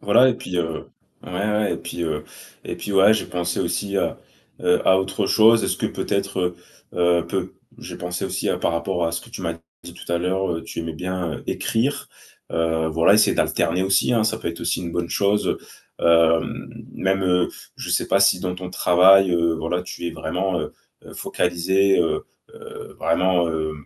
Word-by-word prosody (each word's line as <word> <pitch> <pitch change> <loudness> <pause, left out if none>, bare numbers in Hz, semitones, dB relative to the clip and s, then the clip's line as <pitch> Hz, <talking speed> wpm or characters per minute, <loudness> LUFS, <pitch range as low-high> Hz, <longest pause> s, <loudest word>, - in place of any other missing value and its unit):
Voilà 120 +6 +5
et 125 - +1
puis 90 -6 -6
heu, 80 -2 -3 0.4
ouais, - - -10
ouais 105 +2 0
et - - -5
puis, 85 - -6
heu 75 -2 -2 0.4
et - - -5
puis, 105 - -5
ouais, 100 +3 +6
j'ai 110 - -2
pensé 85 -1 -2
aussi 100 +3 -2
à, - - -1 0.4
heu, 90 - +1
à 95 0 +6
autre 95 +1 -1
chose, 110 0 +5
est-ce - - 0
que - - -1
peut-être, 95 -3 -2 0.4
heu, 85 -1 +2
peut - - -3 0.2
j'ai - - -8
pensé 90 0 -4
aussi - - -2
par - - +1
rapport 85 0 -1
à 85 - -2
ce 85 - -2
que 120 - -16
tu - - -8
m'as 85 -1 -2 0.3
dit - - -10
tout 85 - -7
à 85 - +2
l'heure, 95 +2 -1
heu, 80 - -4
tu 85 - -6
aimais 80 -1 -4
bien, 90 -1 -3
heu, - - -13
écrire, 125 +6 -1 0.4
heu, 80 -1 0
voilà, 80 +5 +4
essayer 105 0 +4
d'alterner 90 +3 +1
aussi, 95 +5 +2
hein, 110 -2 +2
ça 110 0 0
peut 85 - -4
être 85 - -7
aussi - - -1
une 85 -1 -5
bonne 85 -1 -2
chose, 100 +1 +1
heu, - - 0 0.8
hem, - - -7 0.2
même, 95 0 0
heu, 90 -1 +2 0.3
je - - -7
sais - - +1
pas 100 - +2
si 100 -2 +4
dans 90 -1 -2
ton 90 0 -7
travail, 95 +2 +5
heu, 85 -1 +2
voilà, 80 +3 -2
tu 85 -1 -7
es - - -2
vraiment, 90 +2 -2
heu 75 - -5 0.3
heu, - - -12
focalisé, 95 +3 +1
heu 405 +1 0 0.3
heu, 450 -1 -11
vraiment, 90 0 +2
heu, 80 -1 -2
90 Hz, 205 wpm, -22 LUFS, 85-100 Hz, 0.8 s, ouais